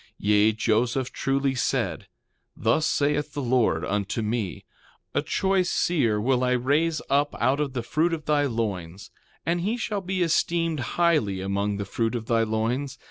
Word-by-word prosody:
3:7 -, -, -27 dB
Yea, 105 Hz, +1 st, +3 dB
Joseph 120 Hz, +4 st, 0 dB
truly 135 Hz, 0 st, 0 dB
said: 125 Hz, -, -1 dB, 0.5 s
Thus 115 Hz, +9 st, +2 dB
saith 150 Hz, +1 st, 0 dB
the 145 Hz, -, -3 dB
Lord 120 Hz, -10 st, +2 dB
unto 105 Hz, +3 st, -2 dB
me: 105 Hz, -3 st, -3 dB, 0.5 s
A -, -, +1 dB
choice 190 Hz, -2 st, +1 dB
seer 120 Hz, -12 st, +1 dB
will 125 Hz, +3 st, +1 dB
I 125 Hz, 0 st, +2 dB
raise 150 Hz, +6 st, +1 dB
up 145 Hz, +1 st, +1 dB
out 135 Hz, +3 st, +2 dB
of 145 Hz, -3 st, -1 dB
the 120 Hz, -3 st, -3 dB
fruit 160 Hz, +8 st, +1 dB
of 160 Hz, -3 st, -4 dB
thy 145 Hz, -1 st, +2 dB
loins; 100 Hz, -7 st, -4 dB, 0.3 s
and 170 Hz, +1 st, 0 dB
he 215 Hz, +7 st, -1 dB
shall 210 Hz, -3 st, -2 dB
be 185 Hz, 0 st, -1 dB
esteemed 165 Hz, -1 st, +1 dB, 0.2 s
highly 155 Hz, -, +2 dB
among 100 Hz, +2 st, -1 dB
the 100 Hz, -, -3 dB
fruit 115 Hz, +4 st, -1 dB
of 115 Hz, -2 st, -4 dB
thy 115 Hz, -1 st, +2 dB
loins. 115 Hz, +5 st, -1 dB
130 Hz, 170 wpm, -25 LUFS, 110-155 Hz, 0.5 s, Yea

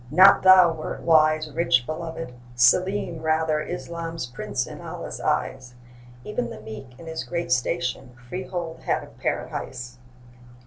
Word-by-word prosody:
not 185 Hz, +7 st, +7 dB
thou 185 Hz, -3 st, +7 dB
wert 155 Hz, -1 st, -6 dB
wise, 155 Hz, -1 st, +4 dB
Rich, 130 Hz, -6 st, +2 dB
belovèd; 160 Hz, -3 st, -5 dB, 0.2 s
Selim, 170 Hz, +7 st, +3 dB
rather, 155 Hz, -1 st, +1 dB
'Islam's 165 Hz, -2 st, -5 dB
prince 120 Hz, 0 st, -3 dB
in -, -, -9 dB
Allah's -, -, -7 dB
eyes! 125 Hz, -1 st, -2 dB, 0.5 s
Even 225 Hz, +4 st, -3 dB
the -, -, -8 dB
meek, 110 Hz, +4 st, -10 dB
in 170 Hz, -, -11 dB
his 160 Hz, 0 st, -4 dB
great 170 Hz, -6 st, -3 dB
station, 125 Hz, -1 st, -1 dB
Freehold 175 Hz, +1 st, -5 dB
had -, -, -1 dB
of -, -, -15 dB
Paradise. 125 Hz, -1 st, -4 dB
160 Hz, 135 wpm, -24 LUFS, 125-170 Hz, 0.5 s, not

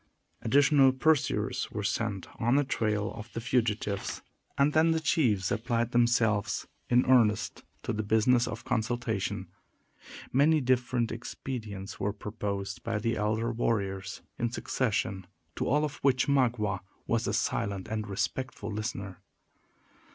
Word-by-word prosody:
Additional 140 Hz, +2 st, +5 dB
pursuers 150 Hz, +2 st, +1 dB
were 105 Hz, -, -4 dB
sent 105 Hz, -2 st, -1 dB, 0.2 s
on 120 Hz, +3 st, +3 dB
the 145 Hz, -, +4 dB
trail 105 Hz, -6 st, -1 dB
of 115 Hz, +1 st, -9 dB
the -, -, -3 dB
fugitives; 110 Hz, -4 st, -1 dB, 0.3 s
and 140 Hz, +2 st, +3 dB
then 160 Hz, +1 st, +4 dB
the 160 Hz, 0 st, +2 dB
chiefs 120 Hz, -, +1 dB
applied 115 Hz, +1 st, 0 dB
themselves, 120 Hz, -4 st, +2 dB, 0.2 s
in 125 Hz, +1 st, +4 dB
earnest, 110 Hz, -5 st, +3 dB, 0.2 s
to -, -, -2 dB
the 110 Hz, -, -1 dB
business 110 Hz, +3 st, +3 dB
of 115 Hz, +1 st, -6 dB
consultation. 120 Hz, -4 st, -1 dB, 0.8 s
Many 150 Hz, +4 st, +5 dB
different 125 Hz, -2 st, +1 dB
expedients 110 Hz, -4 st, -6 dB
were 100 Hz, 0 st, -1 dB
proposed 100 Hz, -3 st, -4 dB
by 115 Hz, -2 st, -2 dB
the 115 Hz, +2 st, 0 dB
elder 110 Hz, +3 st, 0 dB
warriors, 100 Hz, -4 st, -2 dB, 0.2 s
in 120 Hz, -, +1 dB
succession, 105 Hz, -6 st, -1 dB, 0.3 s
to -, -, -2 dB
all 150 Hz, +4 st, +3 dB
of 145 Hz, -1 st, -6 dB
which 130 Hz, -2 st, +2 dB
Magua 120 Hz, -8 st, +2 dB, 0.3 s
was -, -, 0 dB
a -, -, +1 dB
silent 100 Hz, -2 st, -1 dB
and 110 Hz, -1 st, -3 dB
respectful 105 Hz, +2 st, -3 dB
listener. 100 Hz, -4 st, -4 dB
115 Hz, 135 wpm, -29 LUFS, 105-125 Hz, 0.8 s, Additional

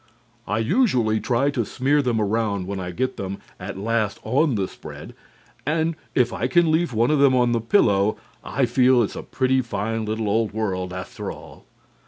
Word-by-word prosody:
I 105 Hz, -, 0 dB
usually 120 Hz, -, +2 dB
try 130 Hz, +5 st, +1 dB
to 125 Hz, -4 st, -1 dB
smear 135 Hz, +6 st, +1 dB
them 120 Hz, -4 st, 0 dB
around 105 Hz, -2 st, 0 dB
when 100 Hz, +1 st, -4 dB
I 90 Hz, -1 st, -4 dB
get 130 Hz, +9 st, -2 dB
them 95 Hz, 0 st, -4 dB, 0.2 s
at 95 Hz, +1 st, -6 dB
last 110 Hz, 0 st, -1 dB
on 135 Hz, +3 st, +2 dB
the 95 Hz, -2 st, 0 dB
spread, -, -, -10 dB, 0.5 s
and 160 Hz, +1 st, 0 dB, 0.2 s
if 125 Hz, -2 st, +2 dB
I -, -, -1 dB
can 175 Hz, -2 st, +3 dB
leave 165 Hz, 0 st, +1 dB
one 115 Hz, +4 st, +2 dB
of 150 Hz, -, +2 dB
them 140 Hz, -2 st, +5 dB
on 120 Hz, -1 st, +3 dB
the 115 Hz, -1 st, +1 dB
pillow, 105 Hz, -, +3 dB, 0.3 s
I 135 Hz, 0 st, 0 dB
feel 125 Hz, +1 st, +4 dB
that -, -, +4 dB
it's 100 Hz, -, -4 dB
a -, -, -5 dB
pretty 130 Hz, 0 st, +1 dB
fine 110 Hz, -1 st, -3 dB
little 110 Hz, 0 st, -2 dB
old 110 Hz, 0 st, +1 dB
world, 95 Hz, -4 st, -2 dB
after 95 Hz, 0 st, -6 dB
all. -, -, -13 dB
115 Hz, 195 wpm, -23 LUFS, 105-130 Hz, 0.5 s, them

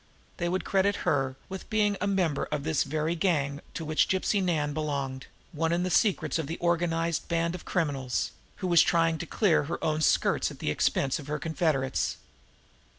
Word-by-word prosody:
They 175 Hz, -1 st, -1 dB
would 185 Hz, +1 st, -1 dB
credit 195 Hz, +1 st, +2 dB
her 135 Hz, -3 st, +1 dB
with 190 Hz, 0 st, -8 dB
being 210 Hz, -2 st, +2 dB
a 205 Hz, -, +1 dB
member 180 Hz, -7 st, +1 dB
of 145 Hz, -, -3 dB
this 160 Hz, -1 st, +1 dB
very 155 Hz, +3 st, -1 dB
gang 150 Hz, -5 st, 0 dB
to 165 Hz, -, -4 dB
which 155 Hz, 0 st, +2 dB
Gypsy 190 Hz, +2 st, +1 dB
Nan 155 Hz, -5 st, 0 dB
belonged, 140 Hz, -4 st, -3 dB, 0.2 s
one 165 Hz, 0 st, -1 dB
in 175 Hz, +1 st, +1 dB
the 185 Hz, -, -1 dB
secrets 170 Hz, -8 st, +2 dB
of 155 Hz, -3 st, -3 dB
an 165 Hz, -, -3 dB
organized 170 Hz, -1 st, 0 dB
band 170 Hz, 0 st, 0 dB
of 180 Hz, -, -8 dB
criminals, 140 Hz, -7 st, -1 dB, 0.2 s
who 185 Hz, -, -4 dB
was 170 Hz, -2 st, +6 dB
trying 165 Hz, -1 st, +2 dB
to 170 Hz, -, -5 dB
clear 170 Hz, -7 st, +2 dB
her 165 Hz, +4 st, -3 dB
own 155 Hz, 0 st, 0 dB
skirts -, -, +2 dB
at -, -, -10 dB
the -, -, -1 dB
expense 135 Hz, +1 st, +1 dB
of 145 Hz, -, -10 dB
her 150 Hz, +1 st, -2 dB
confederates. 155 Hz, -4 st, 0 dB
165 Hz, 190 wpm, -28 LUFS, 150-175 Hz, 0.2 s, was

